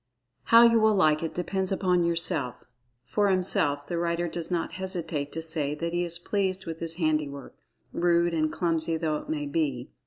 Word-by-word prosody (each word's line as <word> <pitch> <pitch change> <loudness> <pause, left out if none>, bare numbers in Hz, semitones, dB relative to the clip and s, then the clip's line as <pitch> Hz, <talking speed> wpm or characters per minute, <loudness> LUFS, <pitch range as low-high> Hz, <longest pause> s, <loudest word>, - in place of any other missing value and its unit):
How 230 +1 +7
you 230 -1 +5
will 220 -1 +4
like 155 -5 +3
it 165 - -4
depends 190 +2 -2
upon 180 -2 +1
yourself. 165 -6 +1 0.4
For 205 - +1
himself, 145 -6 +1
the 170 +1 -3
writer 170 0 -1
does 170 0 -5
not 175 -2 -2
hesitate 170 -6 -3
to 165 - -3
say 150 -2 -1
that 170 +2 -4
he 175 0 0
is 170 -1 -2
pleased 190 +1 -2
with 165 -1 -6
his 165 0 -2
handiwork, 155 -4 -2 0.4
rude, 170 0 +2
and 155 -1 0
clumsy 165 -2 -1
though 155 -2 -1
it - - -10
may 150 -2 -2
be. 140 -4 -2
170 Hz, 185 wpm, -27 LUFS, 155-180 Hz, 0.4 s, How